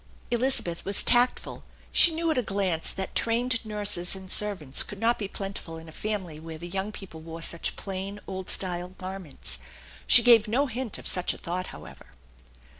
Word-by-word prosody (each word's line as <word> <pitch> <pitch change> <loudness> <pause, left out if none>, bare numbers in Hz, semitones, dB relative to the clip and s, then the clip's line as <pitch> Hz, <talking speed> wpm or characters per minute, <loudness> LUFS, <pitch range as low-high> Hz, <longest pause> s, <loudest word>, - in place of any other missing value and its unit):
Elizabeth 240 -8 +1
was 200 +1 0
tactful. 245 +1 +2 0.3
She 340 - +8
knew 325 0 -1
at 310 - -1
a - - +2
glance 190 -6 -2
that 190 - -4
trained 230 +1 +1
nurses 205 -4 +1
and 190 0 -9
servants 185 -10 +3
could 205 - -6
not 230 +2 +1
be 205 - -3
plentiful 195 -4 -7
in 160 0 -12
a - - -11
family 185 -5 -5
where 160 0 -8
the 175 - -8
young 195 +3 -3
people 190 -6 -10
wore 165 +1 -8
such 170 - 0
plain, 195 +1 -5
old 190 -1 -6
style 180 -1 +1
garments. 185 - -5 0.5
She - - +9
gave 235 -3 +6
no 250 +7 +1
hint 250 -3 -4
of - - -12
such 180 -1 +1
a - - -11
thought, 180 +2 -4
however. - - -12
195 Hz, 185 wpm, -26 LUFS, 175-225 Hz, 0.5 s, She